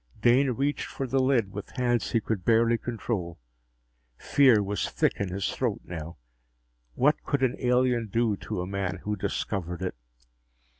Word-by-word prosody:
Dane 125 +5 +4
reached 140 +4 -1
for 135 - -4
the 135 +1 +1
lid 130 -7 +2
with 105 - -8
hands 120 -3 +1
he 115 - +2
could 110 -4 -3
barely 115 +1 +3
control. 105 -8 -3 0.8
Fear 130 -7 +4
was 100 +1 -2
thick - - +1
in 100 -2 -2
his 95 +2 -2
throat - - -1
now. 85 0 -7 0.8
What 150 +4 +3
could 140 -2 -1
an 130 - +2
alien 125 -2 +2
do 115 +1 +1
to 90 - -4
a - - -3
man 95 -1 -3
who 105 0 -1
discovered 90 -2 -3
it? 90 - -2
115 Hz, 160 wpm, -27 LUFS, 95-125 Hz, 0.8 s, Dane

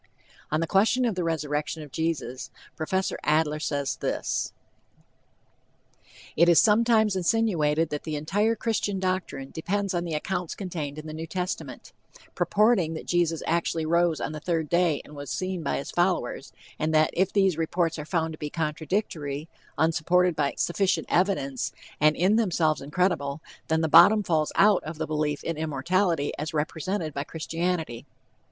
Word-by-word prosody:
On 155 +1 0
the - - +1
question 220 +9 +3
of 230 - +1
the 185 -1 -2
resurrection 155 -1 -2
of 145 - -12
Jesus, 145 -6 -3 0.3
Prof. 190 +4 -1
Adler 155 0 +2
says 140 -2 -2
this: - - -2 1.8
"It 170 +2 +5
is 170 - +7
sometimes 220 -1 +4
insinuated 170 -6 +1
that 150 - -3
the 155 -2 -4
entire 205 +9 +1
Christian 210 -3 -1
doctrine 185 -8 -2
depends 200 +4 -2
on 175 -1 0
the 165 -3 -3
accounts 180 +2 -3
contained 160 -7 -5
in 155 - -7
the 155 - -7
New 160 +1 -6
Testament, 180 +2 -5 0.4
purporting 205 -7 +2
that - - -7
Jesus 170 -2 +1
actually 165 -1 0
rose 170 0 +2
on - - -3
the 155 - -6
third 160 -1 -1
day 170 -4 +2
and 150 - -13
was 145 -1 -7
seen 185 -1 -3
by 140 - -1
his 140 - -5
followers; 175 -7 0 0.3
and 155 +1 0
that 155 0 +4
if 190 +2 +1
these 195 -4 +3
reports 165 0 -1
are - - -4
found 160 0 -1
to 155 - -9
be 150 - -4
contradictory, 155 -2 -3 0.3
unsupported 170 +2 +2
by 145 -2 0
sufficient 190 +2 +1
evidence, 170 -8 0 0.3
and 150 +1 +4
in 190 +5 +3
themselves 170 -8 +1
incredible, 145 -1 0 0.3
then 160 0 +1
the 160 - +1
bottom 175 +7 +7
falls 155 -4 +1
out 205 -1 +5
of 155 +1 -6
the - - -2
belief 150 -1 -2
in 165 -2 -3
immortality 160 +1 0
as 155 +2 -4
represented 160 +2 -2
by 140 - -2
Christianity." 160 -4 -3
165 Hz, 160 wpm, -26 LUFS, 150-185 Hz, 1.8 s, is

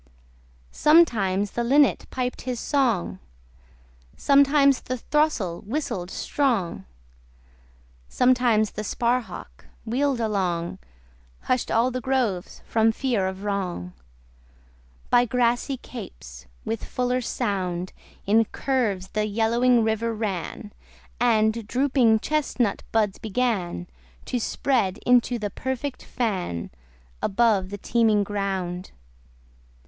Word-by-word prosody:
Sometimes 210 - +3
the 240 - -2
linnet 280 +4 +3
piped 250 -1 -3
his 250 -2 -4
song: 235 - 0 1.0
Sometimes 280 -1 +4
the 255 - -4
throstle 245 - 0
whistled 205 - -3
strong: 200 - -1 1.2
Sometimes 245 -4 +3
the 215 - -5
sparhawk, 240 +2 -3 0.2
wheel'd 260 +3 0
along, 185 -6 -1 0.6
Hush'd 255 -1 0
all 235 +3 +3
the 255 0 -3
groves 240 -9 -1
from 225 0 +3
fear 225 -5 0
of 190 +1 -6
wrong: 185 - -3 1.2
By 245 0 +5
grassy 245 +2 0
capes 65 - -10 0.2
with 225 0 -3
fuller 250 0 -1
sound 185 -6 -2 0.3
In 225 +3 +4
curves 215 -8 -1
the 215 0 -1
yellowing 230 +3 +3
river 225 +1 0
ran, 210 0 -4 0.5
And 220 -2 +2
drooping 250 -4 +3
chestnut 275 -8 0
buds 210 -3 +1
began 205 - -1 0.4
To 250 - -2
spread 225 -5 0
into 245 0 +3
the 210 -3 -4
perfect 260 +3 -4
fan, 185 - -3 0.5
Above 200 -3 +2
the 205 - -5
teeming 220 -1 +2
ground. 190 -3 -3
225 Hz, 100 wpm, -24 LUFS, 195-250 Hz, 1.2 s, By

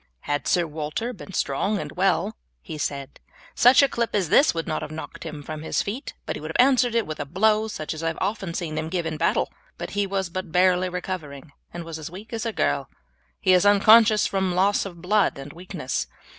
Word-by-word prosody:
"Had 145 0 -2
Sir 175 -1 +2
Walter 155 +10 -4
been 195 -2 -11
strong 185 +9 0
and - - -5
well," - - +1 0.3
he 155 - -7
said, 140 -1 -4 0.3
"such 250 +4 +6
a - - +5
clip 235 -4 -2
as 190 -6 +1
this 280 - +5
would 165 -1 -3
not 155 - -2
have 155 - -5
knocked 155 +1 -8
him 150 -2 -7
from 155 +1 -6
his 160 - -1
feet, 230 +8 -5
but - - -3
he - - -6
would - - -7
have 250 - +5
answered 250 -3 +2
it 230 -3 +2
with 155 - -6
a - - -1
blow 215 +7 +2
such 155 -8 -5
as 155 - -7
I 165 - -1
have 160 - -2
often 195 -4 -2
seen 155 -3 -3
him 160 0 -4
give 175 -1 -2
in 160 -1 -3
battle; - - 0 0.2
but - - -6
he 205 0 0
was 190 -2 -2
but 185 -1 -5
barely 180 +1 +3
recovering 165 -6 -6 0.2
and 175 - -6
was 165 -1 -7
as 155 - -6
weak 200 +7 -11
as 230 0 -2
a - - -1
girl. 70 - -1 0.5
He 185 - +3
is 180 - +5
unconscious 215 +2 +6
from 190 -2 0
loss 200 +2 +2
of 170 -2 -12
blood 205 -1 +2
and 140 +1 -9
weakness. 170 -6 -4
180 Hz, 230 wpm, -24 LUFS, 155-205 Hz, 0.5 s, such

